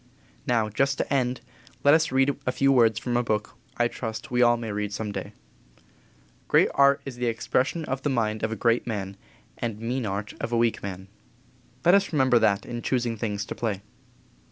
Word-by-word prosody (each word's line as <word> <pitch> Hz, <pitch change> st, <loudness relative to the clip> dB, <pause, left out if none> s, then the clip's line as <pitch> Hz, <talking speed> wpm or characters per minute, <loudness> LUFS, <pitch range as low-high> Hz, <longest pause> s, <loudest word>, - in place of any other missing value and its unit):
Now, 115 Hz, -3 st, +2 dB
just 135 Hz, +6 st, 0 dB
to -, -, -2 dB
end 125 Hz, -2 st, 0 dB, 0.4 s
with -, -, -27 dB
let 145 Hz, -, +7 dB
us 160 Hz, -2 st, +3 dB
read 135 Hz, +1 st, +2 dB
a -, -, +3 dB
few 135 Hz, +1 st, +2 dB
words 115 Hz, -4 st, +4 dB
from 120 Hz, +1 st, -2 dB
a 120 Hz, -, +3 dB
book 110 Hz, -2 st, -2 dB, 0.2 s
I 120 Hz, -, +3 dB
trust 115 Hz, 0 st, -6 dB
we 125 Hz, 0 st, +2 dB
all 120 Hz, -1 st, +5 dB
may 115 Hz, -2 st, -5 dB
read 105 Hz, 0 st, -3 dB
some 105 Hz, +1 st, -4 dB
day: -, -, -5 dB, 1.2 s
"Great -, -, +4 dB
art 140 Hz, 0 st, +4 dB
is 135 Hz, -3 st, -7 dB
the 120 Hz, 0 st, -1 dB
expression 130 Hz, +7 st, 0 dB
of 135 Hz, -1 st, -3 dB
the 145 Hz, -, -1 dB
mind 110 Hz, -4 st, 0 dB
of 110 Hz, -, -1 dB
a -, -, -2 dB
great 115 Hz, +3 st, +1 dB
man, 100 Hz, -4 st, -4 dB, 0.4 s
and 115 Hz, -3 st, -3 dB
mean 120 Hz, +1 st, -2 dB
art 100 Hz, +1 st, -4 dB
of -, -, -3 dB
a 120 Hz, -, +1 dB
weak 115 Hz, -1 st, +1 dB
man." 95 Hz, -1 st, -6 dB, 0.8 s
Let 175 Hz, -, +6 dB
us 200 Hz, 0 st, +3 dB
remember 130 Hz, -5 st, +4 dB
that 100 Hz, -3 st, +2 dB
in 120 Hz, -1 st, -5 dB
choosing 120 Hz, -3 st, 0 dB
things 105 Hz, -2 st, -3 dB
to -, -, -5 dB
play. 105 Hz, -4 st, -3 dB
120 Hz, 205 wpm, -26 LUFS, 110-130 Hz, 1.2 s, let